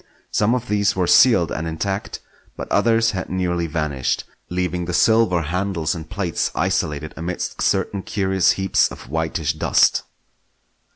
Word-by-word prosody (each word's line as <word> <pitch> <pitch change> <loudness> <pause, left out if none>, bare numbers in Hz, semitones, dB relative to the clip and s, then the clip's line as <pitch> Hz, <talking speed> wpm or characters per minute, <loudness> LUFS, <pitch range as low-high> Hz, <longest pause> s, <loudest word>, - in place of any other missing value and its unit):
Some 110 +4 +2
of 125 0 -4
these 100 -1 +1
were 95 -1 +1
sealed 95 -3 +5
and 80 - -3
intact, 95 +5 -4 0.4
but - - -5
others 115 -1 +3
had 95 -2 -5
nearly 90 -2 -1
vanished, 75 -5 -2 0.3
leaving 90 -1 -2
the 90 0 -2
silver 110 -7 +3
handles 85 0 -1
and 80 -2 -8
plates 90 -4 -1
isolated 80 -5 -1
amidst 85 +2 -4
certain 100 - 0
curious 95 -2 +1
heaps 95 0 +2
of - - -11
whitish 80 0 -1
dust. 80 - +3
90 Hz, 140 wpm, -21 LUFS, 80-100 Hz, 0.4 s, sealed